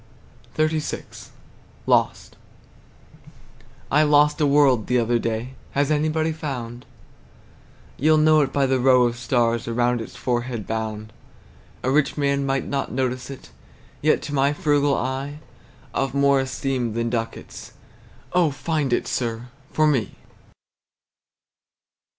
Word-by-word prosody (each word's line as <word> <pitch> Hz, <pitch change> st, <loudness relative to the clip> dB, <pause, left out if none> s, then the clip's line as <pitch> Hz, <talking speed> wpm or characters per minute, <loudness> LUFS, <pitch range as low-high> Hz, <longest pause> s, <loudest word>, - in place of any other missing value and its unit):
XXXVI. 155 Hz, 0 st, -2 dB, 0.6 s
LOST. -, -, +1 dB, 1.6 s
I 150 Hz, -, +5 dB
lost 150 Hz, +1 st, +4 dB
a 150 Hz, -, +4 dB
world 140 Hz, -5 st, +3 dB
the 125 Hz, -, +2 dB
other 120 Hz, 0 st, +1 dB
day. 115 Hz, +3 st, -3 dB, 0.2 s
Has 140 Hz, +1 st, +1 dB
anybody 155 Hz, +1 st, +1 dB
found? 125 Hz, -6 st, -6 dB, 1.1 s
You'll 155 Hz, +3 st, +4 dB
know 155 Hz, 0 st, +5 dB
it 140 Hz, -, 0 dB
by 140 Hz, -1 st, +2 dB
the 130 Hz, -1 st, +1 dB
row 125 Hz, 0 st, +5 dB
of 120 Hz, -1 st, +1 dB
stars 120 Hz, -2 st, 0 dB
Around 120 Hz, +1 st, +1 dB
its 115 Hz, -, -9 dB
forehead 120 Hz, -3 st, -2 dB
bound. 110 Hz, -1 st, -4 dB, 0.7 s
A 130 Hz, -, +1 dB
rich 145 Hz, +1 st, +1 dB
man 140 Hz, -1 st, 0 dB
might 135 Hz, 0 st, 0 dB
not 140 Hz, -1 st, -3 dB
notice 130 Hz, 0 st, -2 dB
it; 135 Hz, -, -10 dB, 0.5 s
Yet 155 Hz, +1 st, +2 dB
to 145 Hz, -, -6 dB
my 140 Hz, +1 st, +2 dB
frugal 145 Hz, -1 st, +2 dB
eye 135 Hz, +3 st, -3 dB, 0.6 s
Of 135 Hz, +2 st, -1 dB
more 140 Hz, 0 st, +4 dB
esteem 130 Hz, -3 st, -2 dB
than 115 Hz, 0 st, -1 dB
ducats. 115 Hz, -2 st, -5 dB, 0.6 s
Oh, 180 Hz, -3 st, +4 dB
find 145 Hz, 0 st, -2 dB
it, -, -, 0 dB
sir, 120 Hz, 0 st, -3 dB, 0.2 s
for 155 Hz, -, +2 dB
me! 130 Hz, -9 st, +1 dB
135 Hz, 125 wpm, -23 LUFS, 120-145 Hz, 1.6 s, I